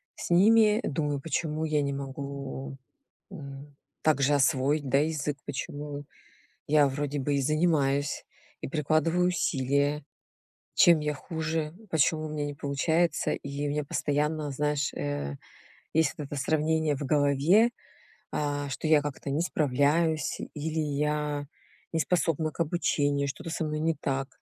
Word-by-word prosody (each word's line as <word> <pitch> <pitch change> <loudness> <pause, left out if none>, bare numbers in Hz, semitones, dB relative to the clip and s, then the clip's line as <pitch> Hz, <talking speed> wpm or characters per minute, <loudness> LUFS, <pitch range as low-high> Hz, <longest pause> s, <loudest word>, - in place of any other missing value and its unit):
с - - -6
ними, 215 +5 +5
думаю, 145 -1 -1
почему 155 +1 -2
я 150 -2 +1
не 140 0 -1
могу, 140 0 -6 0.5
м, 140 -4 -9 0.3
так 155 -3 +3
же 145 +2 +4
освоить, 140 +1 +2
да, 135 - +4
язык, 150 -1 -1
почему 145 +1 -5 0.6
я 145 -1 +5
вроде 145 +1 -2
бы 140 +1 0
и 140 - +1
занимаюсь, 145 -2 +1 0.4
и - - -4
прикладываю 155 +4 +2
усилия, 140 -3 +1 0.7
чем 170 -3 +7
я 150 0 -1
хуже? 160 +1 -3 0.2
Почему 155 0 +2
у - - -5
меня 150 -1 -2
не 145 - -4
получается? 160 +4 +1
И 140 +1 -4
у - - -1
меня 150 +1 -1
постоянно, 150 +1 -1
знаешь, 150 0 0
э, 70 -1 -3 0.6
есть 160 -2 +3
вот 150 - -4
это 145 - -6
сравнение 155 +1 +1
в 140 - -6
голове, 150 - +4 0.6
а, 145 -1 -1
что 140 - -3
я 155 -1 +5
как-то 145 -1 -5
не 150 +4 +1
справляюсь 155 +1 +1 0.2
или 160 +2 -2
я 150 -1 -1 0.5
не 165 - +1
способна 160 -2 +1
к - - -19
обучению, 145 -4 +1
что-то 140 - -6
со 165 0 -2
мной 150 0 -2
не 165 +1 +1
так, 135 -1 -2
150 Hz, 145 wpm, -28 LUFS, 140-160 Hz, 0.7 s, чем